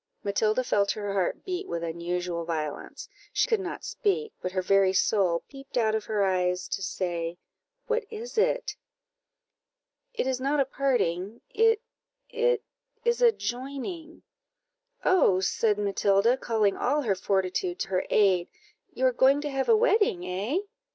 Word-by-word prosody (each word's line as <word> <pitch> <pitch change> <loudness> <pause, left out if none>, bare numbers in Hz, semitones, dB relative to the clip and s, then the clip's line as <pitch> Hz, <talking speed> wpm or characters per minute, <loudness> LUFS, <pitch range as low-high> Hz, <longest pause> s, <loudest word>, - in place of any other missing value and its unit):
Matilda 215 +4 +1
felt 200 -4 +1
her 205 -2 -4
heart 190 -3 -1
beat 370 +1 -3
with 170 0 -3
unusual 170 +1 -3
violence; 155 -3 -5 0.2
she - - +2
could 450 -3 +2
not 380 - -5
speak, 435 +1 -1
but 180 - -3
her 185 0 -1
very 195 0 +4
soul 185 -4 +2
peeped 275 -2 -9
out 220 -2 +2
of 220 -1 -1
her 210 -2 0
eyes 180 -1 0
to - - -3
say 175 -3 -3 0.5
"What 460 -1 -1
is 460 +2 -7
it?" - - +1 1.4
"It - - 0
is 260 -1 -1
not 285 +2 +1
a 275 - +4
parting; 235 -7 -1
it 450 +1 +3 0.5
it 475 -1 +1 0.4
is 475 +1 +2
a 475 -1 +7
joining." 280 - -6 0.8
"Oh," 200 - +4
said 210 +2 +1
Matilda, 200 +2 +2
calling 220 -6 +1
all 290 +3 0
her 215 -5 +2
fortitude 195 - -1
to - - -3
her 185 -1 0
aid, 190 -4 +3 0.4
"you 260 -5 -1
are 255 - +4
going 265 +3 +4
to 295 -1 -3
have 270 0 -1
a 450 - +7
wedding, 420 - +2
eh?" 195 - -2
220 Hz, 155 wpm, -27 LUFS, -, 1.4 s, a